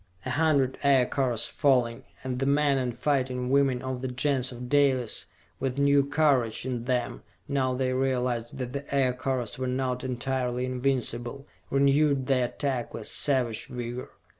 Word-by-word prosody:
A - - -2
hundred 145 -4 +2
Aircars 130 -3 +2
falling, 125 -5 +1 0.2
and 130 -1 -3
the 135 - 0
men 140 -1 +3
and 125 -2 -3
fighting 125 -2 0
women 135 -3 +2
of 130 -1 -4
the 130 - -2
Gens 130 +1 0
of 125 0 -7
Dalis, 130 -4 +2 0.3
with 135 -1 -2
new 140 0 +4
courage 135 -6 +1
in 125 -2 -3
them 120 - -1 0.3
now 130 -2 0
they 130 0 0
realized 125 -3 -1
that 125 -1 -4
the 140 0 -4
Aircars 130 -2 0
were 130 - -1
not 125 0 -1
entirely 125 0 -1
invincible, 130 0 -2 0.2
renewed 140 0 +3
the 130 -2 +2
attack 130 -2 -3
with 110 - -6
savage 125 -6 0
vigor. 120 0 -5
130 Hz, 150 wpm, -27 LUFS, 125-140 Hz, 0.3 s, new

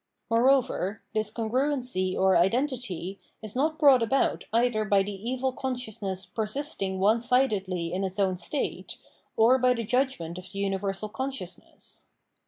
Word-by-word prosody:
Moreover, 230 -5 +2
this 215 -1 0
congruency 245 -4 -1
or 190 0 +4
identity, 195 - 0 0.2
is 215 +1 -8
not 310 +4 +1
brought 280 -5 +6
about 230 +4 +1
either 230 -1 +2
by 200 -2 +3
the 205 - -5
evil 250 +6 -2
consciousness 220 -8 -4
per 220 -2 -3
sisting 210 -7 -3
onesidedly 205 -5 +1
in 190 +2 -1
its 190 0 -3
own 190 -2 +2
state, 185 - -4 0.4
or 240 +4 +5
by 250 0 +3
the 230 - -2
judgment 215 -8 -1
of 185 +1 -11
the - - -7
universal 195 +1 -2
consciousness. 260 +5 -7
220 Hz, 140 wpm, -27 LUFS, 195-255 Hz, 0.4 s, brought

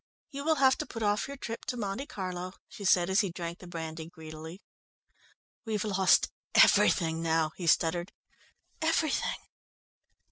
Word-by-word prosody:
"You 280 -1 -5
will 320 +1 +3
have 265 -2 +4
to - - -3
put 225 -2 -5
off 205 0 +1
your 280 0 -7
trip 230 -3 -6
to 250 - -3
Monte 215 +5 -3
Carlo," 185 -6 -5
she 215 - -10
said, 180 -2 +4
as 190 +2 +3
he 200 - +2
drank 170 0 -6
the 180 - -11
brandy 160 -1 -6
greedily. 160 +1 -10 1.0
"We've 215 -4 -2
lost 195 -3 +3 0.2
everything 165 -2 +5
now," 160 -1 +1
he 175 - -5
stuttered, 170 +2 +2 0.7
"everything." 320 -2 +1
185 Hz, 150 wpm, -30 LUFS, 165-225 Hz, 1.0 s, everything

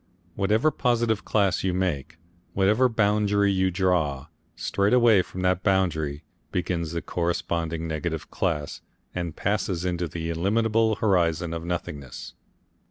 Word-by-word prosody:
Whatever 105 - +2
positive 120 -5 +1
class 100 -4 +1
you 95 -2 0
make, 80 -4 -2 0.4
whatever 105 +7 +3
boundary 105 -2 +2
you 95 -1 +2
draw, 85 -7 0 0.3
straight 100 +2 0
away 120 -5 +6
from 90 +1 -7
that 90 -1 +2
boundary 80 -7 0 0.3
begins 85 -2 -2
the 85 - -3
corresponding 85 -1 -2
negative 80 0 -4
class 75 -5 -2 0.3
and 85 -3 -4
passes 95 -3 -1
into 90 -1 -1
the 80 +1 -4
illimitable 110 +5 +2
horizon 85 -5 +1
of 85 0 -4
nothingness. 75 -6 -5
90 Hz, 125 wpm, -25 LUFS, 85-100 Hz, 0.4 s, away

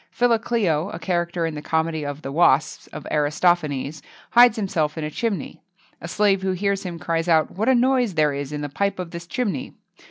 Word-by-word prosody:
Philocleo, 225 -8 +1
a - - -6
character 175 -2 -1
in 165 - -3
the 150 - -6
comedy 160 0 -1
of 145 +1 -6
the 135 - -5
"Wasps" 155 -2 +2
of - - -9
Aristophanes, 150 -1 0 0.3
hides 240 -1 +7
himself 170 -7 -1
in 160 - -3
a 150 - -4
chimney. 220 +4 -3 0.4
A - - -6
slave 200 -2 +2
who 190 -1 0
hears 200 +1 -1
him, 180 -4 -6
cries 165 0 -2
out, 160 -2 +3
"What 220 +7 -1
a 260 - +5
noise 250 -5 +2
there 150 -2 +2
is 140 0 -5
in 150 0 -4
the 145 - -3
pipe 200 +7 -1
of 180 -2 -6
this 170 0 -8
chimney!" 250 +4 -3
170 Hz, 200 wpm, -23 LUFS, 155-200 Hz, 0.4 s, hides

